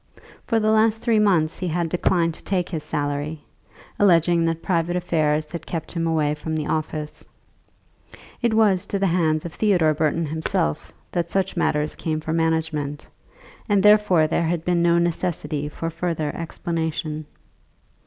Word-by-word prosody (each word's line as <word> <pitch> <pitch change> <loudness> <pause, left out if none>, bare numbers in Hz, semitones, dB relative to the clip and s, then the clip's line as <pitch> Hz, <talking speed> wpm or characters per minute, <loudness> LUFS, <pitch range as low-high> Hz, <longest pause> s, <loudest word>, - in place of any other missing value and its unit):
For 230 - +2
the 215 0 +2
last 220 0 +2
three 230 -3 +3
months 175 -7 +2
he 185 - -2
had 170 0 -1
declined 170 -1 +1
to - - -12
take 185 -3 -1
his 160 -4 -3
salary, 145 +1 -3 0.6
alleging 170 -3 +4
that 165 0 -2
private 175 -1 0
affairs 155 -4 0
had 170 - -7
kept 165 -2 -4
him 165 -1 -1
away 155 -2 +1
from 160 +1 -4
the 155 -1 -2
office. 155 -1 -4 1.1
It 235 -3 +1
was 205 -5 +3
to 200 - -1
the 195 - +1
hands 165 -3 +1
of 170 - -6
Theodore 180 -8 +3
Burton 155 +2 0
himself 80 - -2 0.2
that 170 -1 -1
such 190 +1 -1
matters 150 -3 0
came 155 -1 -2
for 160 +1 -3
management, 160 -3 -1 0.6
and 200 -2 +3
therefore 210 -6 +5
there 165 +1 0
had 165 -1 -2
been 175 -1 +2
no 170 0 +4
necessity 165 -4 -1
for 165 +2 -4
further 165 -2 -2
explanation. 160 -2 -3
165 Hz, 160 wpm, -23 LUFS, 155-180 Hz, 1.1 s, therefore